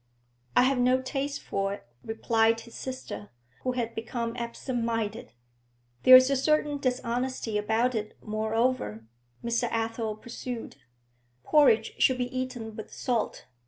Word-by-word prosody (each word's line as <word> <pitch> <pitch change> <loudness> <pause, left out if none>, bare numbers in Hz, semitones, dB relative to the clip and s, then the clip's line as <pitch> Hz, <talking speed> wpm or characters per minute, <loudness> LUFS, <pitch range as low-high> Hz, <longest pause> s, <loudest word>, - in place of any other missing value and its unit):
'I - - +7
have 260 0 +2
no 250 +1 +4
taste 275 +2 -3
for 195 0 -1
it,' - - -16 0.2
replied 225 0 +2
his 235 0 -14
sister, 110 - -6 0.3
who 255 - -1
had 235 -2 -2
become 230 +1 -3
absent 240 +1 -3
minded. 225 -1 -2 0.7
'There's 255 +1 +9
a - - +3
certain 295 +1 +2
dishonesty 250 -3 -1
about 220 +4 +1
it, 215 -2 -4
moreover,' 215 - -1 0.4
Mr. 235 +1 +1
Athel 225 -1 -2
pursued. 240 +1 -7 0.7
'Porridge 245 -8 +4
should 260 - +5
be 245 0 -3
eaten 245 -4 -4
with 220 - -8
salt. 240 -4 -2
235 Hz, 130 wpm, -28 LUFS, 225-255 Hz, 0.7 s, There's